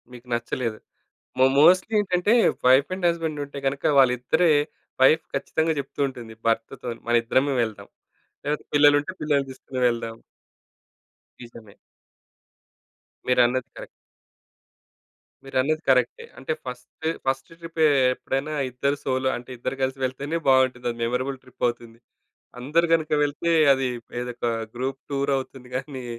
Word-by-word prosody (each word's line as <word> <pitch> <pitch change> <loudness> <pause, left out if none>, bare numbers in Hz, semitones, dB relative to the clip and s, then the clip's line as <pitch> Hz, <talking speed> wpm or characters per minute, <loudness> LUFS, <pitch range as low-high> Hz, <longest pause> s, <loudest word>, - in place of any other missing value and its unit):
మీకు 125 0 -13
నచ్చలేదు. 120 -1 -2 0.6
మో 130 - +6
మోస్ట్‌లి 185 +8 +5
ఏంటంటే 185 0 +1 0.3
వైఫ్ 130 +3 +5
అండ్ 185 -1 -1
హస్బాండ్ 160 -3 -2
ఉంటే 140 0 -9
గనుక 135 +1 -2
వాళ్ళిద్దరే 130 +6 +3 0.5
వైఫ్ 155 +5 +6
ఖచ్చితంగా 160 +1 0
చెప్తూ 140 - -9
ఉంటుంది 120 -4 -10
భర్తతో‌న్ని 115 +1 -2
మన 120 - +2
ఇద్దరమే 130 +4 +1
వెళ్దాం. 110 -2 -5 0.6
లేకపోతే 150 +1 -2
పిల్లలుంటే 145 +3 +4
పిల్లల్ని 140 -3 +1
తీసుకొని 130 0 -7
వెళ్దాం. 115 -1 -3 1.2
నిజమే. 115 -4 -13 1.5
మీరన్నది 125 0 +3
కరెక్ట్. - - -8 1.6
మీరన్నది 135 +4 0
కరె‌క్టే. 125 -2 +2
అంటే 135 +5 -3
ఫస్ట్, 125 +5 -9 0.2
ఫస్ట్ 135 +2 -2
ట్రిపే 165 -1 0 0.3
ఎప్పుడైనా 135 +5 -3 0.2
ఇద్దరు 140 +3 -1
సోలో 130 0 0
అంటే 120 +1 -12
ఇద్దరు 130 +3 -4
కలిసి 130 +1 -2
వెళ్తేనే 140 +6 -3
బావుంటది. 130 -2 +3
అది 120 - -10
మెమరబుల్ 130 +3 -2
ట్రిప్ 125 -1 -4
అవుతుంది. 120 -1 -6 0.6
అందరూ 155 +7 +2
గనుక 160 -2 -1
వెళ్తే 145 +4 -2 0.2
అది 135 -1 0 0.3
ఏదో 125 0 -4
ఒక 120 - -3 0.3
గ్రూప్ 130 +2 -3
టూర్ 140 0 0
అవుతుంది 130 -1 -9
గాని! 130 -1 -6
135 Hz, 125 wpm, -24 LUFS, 125-145 Hz, 1.6 s, మో